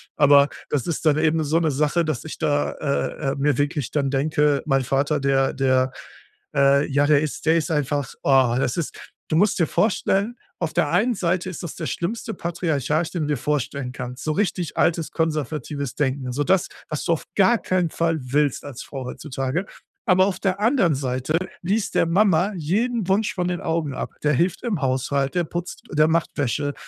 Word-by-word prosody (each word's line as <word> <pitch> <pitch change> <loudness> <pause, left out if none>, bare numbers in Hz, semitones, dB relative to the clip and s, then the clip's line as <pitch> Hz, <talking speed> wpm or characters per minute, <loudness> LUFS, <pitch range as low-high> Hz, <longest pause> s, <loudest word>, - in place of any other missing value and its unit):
Aber 145 -1 +6 0.2
das 140 -4 -1
ist 170 -1 -3
dann 150 -2 +4
eben 160 0 +2
so 155 +2 +1
'ne 165 -2 +1
Sache, 150 +4 +1
dass 155 -6 -2
ich 160 - -7
da, 145 -2 +1
äh, 140 -1 -2
äh, - - -3
mir 145 +1 +1
wirklich 145 -3 -1
dann 140 -2 0
denke, 145 +1 +1
mein 135 -3 +2
Vater, 140 +4 +1
der 135 -1 +2
der, 130 -1 +2 0.6
äh, 140 +1 +4
ja 140 +1 +2
der 145 -1 +4
ist 155 -2 -4
der 160 +1 +4
ist 160 - -1
einfach, 145 -2 -1
oh 130 -3 +4
das 130 -2 0
ist 170 - -3 0.3
du 155 - +2
musst 200 +3 +3
dir 170 - +4
vorstellen, 200 +4 +1 0.2
auf - - -2
der - - +1
einen 245 0 +2
Seite 180 0 -1
ist 180 - -7
das 170 - -6
der 160 - -4
schlimmste 220 +5 -3
Patriarch, 160 -2 -1
den 170 -4 -2
du - - -2
dir - - -1
vorstellen 140 -1 -2
kannst, 125 0 -7
so 155 - 0
richtig 180 -3 -1
altes 165 -1 +1
konservatives 150 -4 -2
Denken. 130 -2 -1
So 145 +3 0
das, 185 +2 +2 0.2
was 150 -2 -3
du 170 - +3
auf 160 - -3
gar 220 +4 +5
keinen 185 -5 0
Fall 165 0 0
willst 140 +2 0
als 140 -3 -7
Frau 135 -2 -7
heutzutage. 135 +6 -3 0.4
Aber 185 0 +5
auf 190 -2 -2
der 190 0 0
anderen 215 - +3
Seite 130 +3 -1 0.2
liest 200 +4 -1
der - - +4
Mama 185 +1 +3
jeden 210 +7 0
Wunsch 210 +5 +1
von 180 -2 -1
den 180 -1 -2
Augen 160 -3 -1
ab. - - -4
Der 150 0 +3
hilft 170 +6 +1
im 210 -10 -1
Haushalt, 135 +1 0
der 175 -2 +1
putzt, 175 +2 -6
der 155 +1 +4
macht 165 0 +1
Wäsche, 145 +2 -1
150 Hz, 200 wpm, -23 LUFS, 140-175 Hz, 0.6 s, Aber